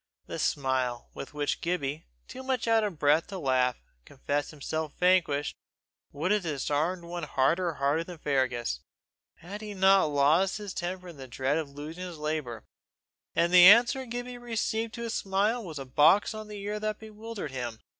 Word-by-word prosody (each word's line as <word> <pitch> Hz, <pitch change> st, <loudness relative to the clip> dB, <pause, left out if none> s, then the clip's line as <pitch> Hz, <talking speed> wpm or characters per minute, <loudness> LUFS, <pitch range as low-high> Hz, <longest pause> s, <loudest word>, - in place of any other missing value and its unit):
The -, -, -6 dB
smile 130 Hz, -3 st, -1 dB
with 145 Hz, -, -8 dB
which 145 Hz, -1 st, -1 dB
Gibbie, 155 Hz, -4 st, -2 dB, 0.2 s
too -, -, -8 dB
much 260 Hz, -3 st, -2 dB
out 225 Hz, -1 st, +4 dB
of 200 Hz, -6 st, -3 dB
breath 150 Hz, +3 st, +3 dB
to 195 Hz, -, -6 dB
laugh, 130 Hz, -5 st, +1 dB, 0.2 s
confessed 145 Hz, -, -3 dB
himself 155 Hz, +1 st, -4 dB
vanquished, 175 Hz, -6 st, +2 dB, 0.6 s
would 160 Hz, +7 st, -1 dB
have 210 Hz, 0 st, +3 dB
disarmed 155 Hz, +2 st, -1 dB
one 175 Hz, +1 st, -6 dB
harder 165 Hz, +6 st, +1 dB
hearted 145 Hz, +4 st, 0 dB
than 180 Hz, -2 st, -8 dB
Fergus, 130 Hz, -, -1 dB, 0.6 s
had 200 Hz, +5 st, -9 dB
he 210 Hz, -1 st, -7 dB
not 190 Hz, 0 st, +5 dB
lost 155 Hz, +7 st, +3 dB
his 205 Hz, -2 st, -6 dB
temper 180 Hz, +1 st, -4 dB
in 165 Hz, -, -11 dB
the 135 Hz, -1 st, -9 dB
dread 135 Hz, +5 st, 0 dB
of 155 Hz, -3 st, -4 dB
losing 150 Hz, +5 st, -8 dB
his 175 Hz, -3 st, -7 dB
labour; 150 Hz, -7 st, -3 dB, 0.7 s
and 170 Hz, +1 st, +2 dB
the 180 Hz, -1 st, +9 dB
answer 240 Hz, +5 st, +6 dB
Gibbie 245 Hz, +1 st, -5 dB
received 225 Hz, -1 st, -2 dB
to 235 Hz, -, -5 dB
his 230 Hz, -1 st, -3 dB
smile 205 Hz, +5 st, 0 dB
was 165 Hz, -6 st, -7 dB
a 135 Hz, -, -6 dB
box 155 Hz, +12 st, +4 dB
on 215 Hz, 0 st, -7 dB
the 210 Hz, -1 st, -8 dB
ear 210 Hz, +1 st, -3 dB
that 215 Hz, 0 st, -2 dB
bewildered 220 Hz, -6 st, -7 dB
him. 120 Hz, -4 st, -5 dB
170 Hz, 175 wpm, -28 LUFS, 145-205 Hz, 0.7 s, the